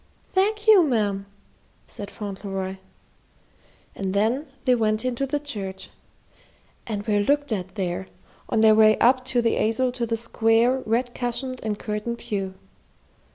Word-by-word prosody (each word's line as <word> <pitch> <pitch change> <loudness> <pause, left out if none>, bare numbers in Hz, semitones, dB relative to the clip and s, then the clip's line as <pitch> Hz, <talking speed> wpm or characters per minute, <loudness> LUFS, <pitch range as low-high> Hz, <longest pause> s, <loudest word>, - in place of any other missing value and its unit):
"Thank 420 +3 +1
you, 425 -4 +8
ma'am," 205 - 0 0.6
said 200 -1 -8
Fauntleroy. 195 -2 -5 1.2
And 195 0 -3
then 230 +9 +1 0.2
they 255 - +5
went 220 -1 +1
into 255 +2 -1
the 290 +2 -1
church, 195 -10 -6 1.0
and 205 -2 -3
were 210 -2 +2
looked 285 +6 +1
at 190 -2 -3
there, 185 -1 -3 0.4
on 220 - +2
their 220 -1 +7
way 215 0 +6
up 255 +2 +4
the 240 -3 +1
aisle 250 +4 +1
to 245 -2 -3
the 230 0 -1
square, 230 +2 +2
red 240 +2 0
cushioned 255 +1 -3
and 215 -2 -2
curtained 210 +3 -3
pew. 195 -4 -4
225 Hz, 140 wpm, -24 LUFS, 205-255 Hz, 1.2 s, you